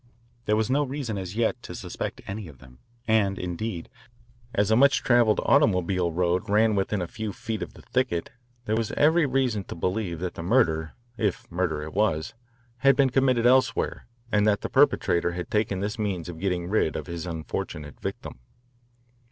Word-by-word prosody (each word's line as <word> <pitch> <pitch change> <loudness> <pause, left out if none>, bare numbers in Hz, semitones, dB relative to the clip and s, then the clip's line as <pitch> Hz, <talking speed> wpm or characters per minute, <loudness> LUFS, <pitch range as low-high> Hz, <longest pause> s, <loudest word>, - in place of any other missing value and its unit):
There 105 - +2
was 110 +3 0
no 140 +2 +3
reason, 130 -7 -3
as 95 +1 -6
yet, 115 0 0
to - - -8
suspect - - -5
any 100 0 -6
of 75 -4 -13
them, 65 -1 -17 0.3
and 105 -3 +2
indeed, 90 0 -4 0.6
as 105 -2 +1
a - - +6
much 140 +4 +4
travelled 120 -3 +4
automobile 90 - +3
road 90 +5 0
ran 110 +2 +4
within 100 -1 0
a - - -4
few 110 +4 -5
feet 110 +1 -5
of - - -6
the - - -14
thicket, 125 -10 -1 0.3
there 110 - 0
was 115 -1 -1
every 160 +1 +4
reason 125 -6 0
to - - -7
believe 90 0 -2
that 90 +2 -4
the - - -7
murder, 85 -6 +2 0.2
if 105 -5 -1
murder 85 -4 -1
it 75 - -8
was, 95 -7 0 0.4
had 135 +3 +4
been 135 -1 +3
committed 130 -2 +2
elsewhere 125 -2 +2 0.2
and 105 0 +3
that 105 -1 +2
the - - -4
perpetrator 85 0 +3
had 90 0 -6
taken 105 -3 0
this 105 +2 -3
means 95 -6 -2
of 85 -2 -7
getting 90 -2 -1
rid 95 -5 +1
of 75 - -4
his 85 0 -6
unfortunate 75 -3 -5
victim. - - -6
100 Hz, 185 wpm, -26 LUFS, 85-115 Hz, 0.6 s, a